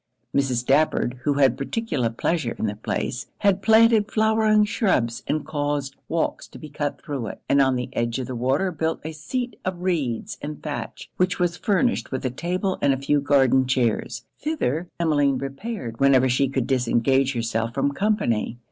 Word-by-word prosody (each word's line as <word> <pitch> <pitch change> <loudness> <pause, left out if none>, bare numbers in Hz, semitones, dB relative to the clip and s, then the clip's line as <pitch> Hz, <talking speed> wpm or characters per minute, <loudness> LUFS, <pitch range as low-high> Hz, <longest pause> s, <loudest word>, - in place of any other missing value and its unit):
Mrs. 130 -4 +1
Stafford, 135 -2 +1
who 145 -1 +2
had 135 -2 +4
particular 140 - -1
pleasure 120 +2 -1
in - - -2
the 105 -1 -2
place, 120 +3 -3
had 200 -2 +2
planted 220 -1 +5
flowering 220 -1 +3
shrubs 160 - 0
and 155 -1 -1
caused 145 -2 -2
walks 165 -1 -1
to - - -13
be 155 - -10
cut 145 0 -3
through 140 -7 -4
it; - - -7
and 140 - +4
on 130 -1 +3
the 125 0 -2
edge 115 +1 -1
of 130 - -3
the 125 - -5
water 135 +10 +1
built 160 0 -2
a 160 - -3
seat 240 - -4
of 180 -1 -4
reeds 145 -11 -2
and 150 +1 -7
thatch, 150 -2 -6
which 185 0 +1
was 175 -1 0
furnished 230 +6 0
with 130 - -3
a 130 - 0
table 180 - -2
and 140 - +4
a - - -1
few 140 +2 +1
garden 135 -2 +3
chairs. 125 -4 0
Thither 180 - -1
Emmeline 145 -5 +2
repaired 135 - -5
whenever 135 -1 +5
she 130 +2 +2
could 130 -2 -1
disengage 130 +2 +2
herself 115 -1 -2
from 140 +1 +1
company. 140 - 0
140 Hz, 180 wpm, -24 LUFS, 130-180 Hz, -, planted